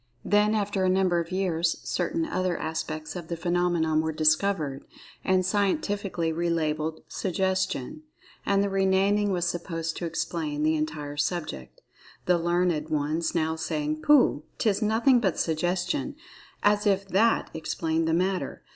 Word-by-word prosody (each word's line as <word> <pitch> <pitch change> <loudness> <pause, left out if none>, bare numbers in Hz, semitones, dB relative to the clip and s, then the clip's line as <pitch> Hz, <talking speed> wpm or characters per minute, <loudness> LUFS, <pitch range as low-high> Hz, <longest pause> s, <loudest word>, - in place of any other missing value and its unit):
Then, 210 +1 +3
after 205 -2 0
a 185 - +3
number 185 -2 +2
of 170 +1 -4
years, 175 -3 0
certain 325 +1 -1
other 185 - -1
aspects 155 0 -4
of 175 -3 -6
the 170 - -4
phenomenon 175 -2 +1
were 160 0 -1
discovered, 155 -2 +1 0.4
and 185 -1 +2
scientifically 200 - 0
relabelled 160 -2 -1
"Suggestion," 190 - -2 0.4
and 200 0 +2
the 200 - 0
re 195 0 +2
naming 200 +2 +2
was 175 -2 0
supposed 165 -1 -3
to 170 - -3
"explain" 160 -2 -2
the 155 +1 +3
entire 150 -1 -3
subject, 150 - -3 0.4
the 180 -1 +3
learned 175 -2 0
ones 155 +3 -1
now 160 -1 +1
saying, 155 -1 -2
"Pooh, 275 - +4 0.2
'tis 215 -1 +1
nothing 230 +4 +4
but 190 -7 0
'Suggestion,'" 180 - -1 0.5
as 205 0 +3
if 195 -1 +1
that 225 +5 +2
explained 160 0 -1
the 160 - +1
matter. 185 +2 -1
175 Hz, 145 wpm, -27 LUFS, 160-195 Hz, 0.5 s, Pooh